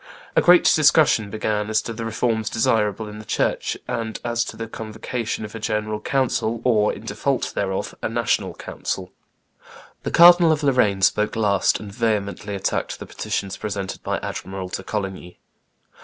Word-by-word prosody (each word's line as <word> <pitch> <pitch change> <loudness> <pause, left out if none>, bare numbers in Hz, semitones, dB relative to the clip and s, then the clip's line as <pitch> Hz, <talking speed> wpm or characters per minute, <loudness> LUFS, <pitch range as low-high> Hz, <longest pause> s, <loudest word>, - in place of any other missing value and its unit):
A - - +5
great 175 0 +6
discussion 150 -8 +4
began 105 0 -2
as 110 - +2
to 115 - -5
the 115 +1 -5
reforms 115 0 -1
desirable 110 -1 +1
in 105 0 -9
the - - -9
church, - - -1
and 115 -2 -3
as 120 0 0
to 110 - -8
the 115 0 -5
convocation 110 +1 -4
of 105 - -10
a 115 - -6
general 105 0 -2
council, 120 -2 0
or, 105 -4 +3
in - - -9
default - - -1
thereof, 95 -1 -2
a - - -1
national - - 0
council. - - -5 0.9
The - - -3
Cardinal 175 -1 +7
of 155 -1 0
Lorraine 105 -8 +2
spoke 105 +2 +2
last, 100 -4 +2
and 105 -2 -8
vehemently 105 -2 -1
attacked 95 - -2
the - - -8
petitions 95 -1 -4
presented 100 -3 -4
by - - -2
Admiral 95 -1 -5
de 95 - -4
Coligny. 95 -3 -5
110 Hz, 165 wpm, -22 LUFS, 105-115 Hz, 0.9 s, Cardinal